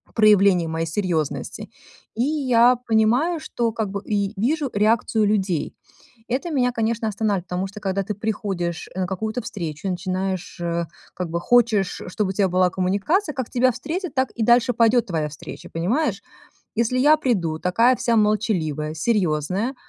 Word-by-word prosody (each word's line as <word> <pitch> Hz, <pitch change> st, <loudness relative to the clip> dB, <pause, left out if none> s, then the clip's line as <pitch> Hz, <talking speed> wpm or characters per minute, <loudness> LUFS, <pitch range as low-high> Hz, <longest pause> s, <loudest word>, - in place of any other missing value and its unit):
проявлений 200 Hz, -5 st, +5 dB
моей 165 Hz, +1 st, -2 dB
серьезности, 165 Hz, -4 st, -2 dB, 0.5 s
и 235 Hz, -, +1 dB
я 255 Hz, -5 st, +4 dB
понимаю, 240 Hz, +10 st, +2 dB
что 235 Hz, -6 st, -2 dB
как 220 Hz, -4 st, -2 dB
бы, 200 Hz, 0 st, -4 dB
и 200 Hz, -1 st, -1 dB
вижу 280 Hz, +5 st, 0 dB
реакцию 215 Hz, +1 st, +2 dB
людей. 195 Hz, -6 st, 0 dB, 0.5 s
Это 275 Hz, +8 st, -2 dB
меня, 250 Hz, -3 st, +2 dB
конечно, 225 Hz, -1 st, -1 dB
останавливает, 200 Hz, -3 st, -1 dB
потому 180 Hz, +2 st, -2 dB
что 205 Hz, +2 st, -10 dB
когда 195 Hz, 0 st, -1 dB
ты 210 Hz, -, -3 dB
приходишь 195 Hz, -5 st, -3 dB
на 185 Hz, -1 st, -1 dB
какую-то 220 Hz, +5 st, -3 dB
встречу 170 Hz, -5 st, -5 dB
и -, -, 0 dB
начинаешь, 185 Hz, 0 st, -3 dB
э, 170 Hz, 0 st, -1 dB, 0.3 s
как 180 Hz, -2 st, -4 dB
бы 170 Hz, -, -2 dB
хочешь, 230 Hz, -5 st, +2 dB
чтобы 190 Hz, +2 st, -2 dB
у -, -, -2 dB
тебя 195 Hz, -1 st, +2 dB
была 185 Hz, 0 st, +2 dB
коммуникация, 200 Hz, -, 0 dB
как 260 Hz, -4 st, -4 dB
тебя 255 Hz, +1 st, +3 dB
встретят, 320 Hz, -, -5 dB
так 260 Hz, 0 st, +1 dB
и 230 Hz, -, -3 dB
дальше 240 Hz, +2 st, +4 dB
пойдет 230 Hz, +1 st, +3 dB
твоя 160 Hz, -5 st, -1 dB
встреча, 145 Hz, -, -10 dB
понимаешь? 200 Hz, -, 0 dB, 0.5 s
Если 235 Hz, +3 st, +1 dB
я 300 Hz, +4 st, +6 dB
приду, 180 Hz, -, -1 dB
такая 230 Hz, +8 st, +3 dB
вся 235 Hz, -1 st, +1 dB
молчаливая, 185 Hz, -9 st, 0 dB
серьезная, 185 Hz, -, 0 dB
210 Hz, 160 wpm, -22 LUFS, 185-240 Hz, 0.5 s, я